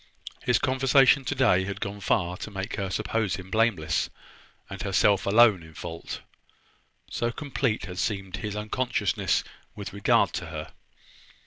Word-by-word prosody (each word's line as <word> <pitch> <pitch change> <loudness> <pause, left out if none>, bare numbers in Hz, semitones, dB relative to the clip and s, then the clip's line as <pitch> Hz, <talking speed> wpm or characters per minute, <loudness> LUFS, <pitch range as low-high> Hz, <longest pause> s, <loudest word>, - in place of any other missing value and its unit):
His 125 - +3
conversation 135 +1 +4
today 125 -10 +3
had 100 0 -5
gone 100 0 -4
far 90 -2 0
to 100 - -6
make 100 0 -5
her 100 -2 -2
suppose 105 -1 -1
him 95 +1 -9
blameless, 105 -9 +1 0.6
and 95 0 -7
herself 100 0 +2
alone 105 -2 +6
in 80 -1 -14
fault; 85 0 -6 0.9
so 120 0 -1
complete 130 -4 -2
had 90 -1 -7
seemed 95 -2 -2
his 105 +1 -4
unconsciousness 105 -1 0 0.3
with 100 -1 -7
regard 100 0 +3
to - - -4
her. - - -7
100 Hz, 140 wpm, -27 LUFS, 95-115 Hz, 0.9 s, alone